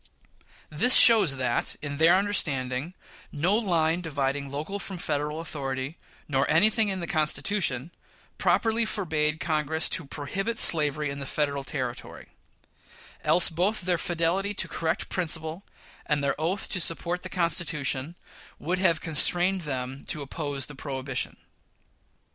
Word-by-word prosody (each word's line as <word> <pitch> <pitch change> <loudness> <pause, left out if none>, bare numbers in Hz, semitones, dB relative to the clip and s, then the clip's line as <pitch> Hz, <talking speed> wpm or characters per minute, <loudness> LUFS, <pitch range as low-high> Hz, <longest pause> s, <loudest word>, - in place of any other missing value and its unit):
This 230 +12 +3
shows 205 - +7
that, 125 -2 -1
in 145 -1 -6
their 165 +3 +5
understanding, 150 -6 -1 0.4
no 170 +7 +1
line 170 -6 +1
dividing 140 -3 -3
local 155 +9 -5
from 195 -2 -6
Federal 150 -1 -3
authority, 135 -2 -5 0.3
nor 135 -2 0
anything 215 +5 +3
in 190 -2 -4
the - - -3
Constitution, 155 -2 -1 0.5
properly 225 0 +2
forbade 160 -8 -1
Congress 155 0 0
to 165 - -2
prohibit 195 +12 -4
slavery 150 -4 +4
in 140 - -7
the 140 - -6
Federal 140 -1 -2
territory; 130 -4 -6 0.9
else 175 -1 +7
both 185 +7 0
their 175 -1 0
fidelity 175 +5 -1
to - - -1
correct 160 -1 -2
principles 165 -1 -2 0.5
and 150 -2 0
their 140 -1 +1
oath 180 +6 -2
to 190 - -1
support 170 +2 -1
the 185 - -8
Constitution 165 -4 -1 0.4
would 180 +4 -3
have 170 -4 +2
constrained 180 +3 +3
them 135 -3 -5
to 150 -3 -3
oppose 140 -1 -3
the 145 - -10
prohibition. 135 -1 -4
160 Hz, 135 wpm, -26 LUFS, 140-180 Hz, 0.9 s, shows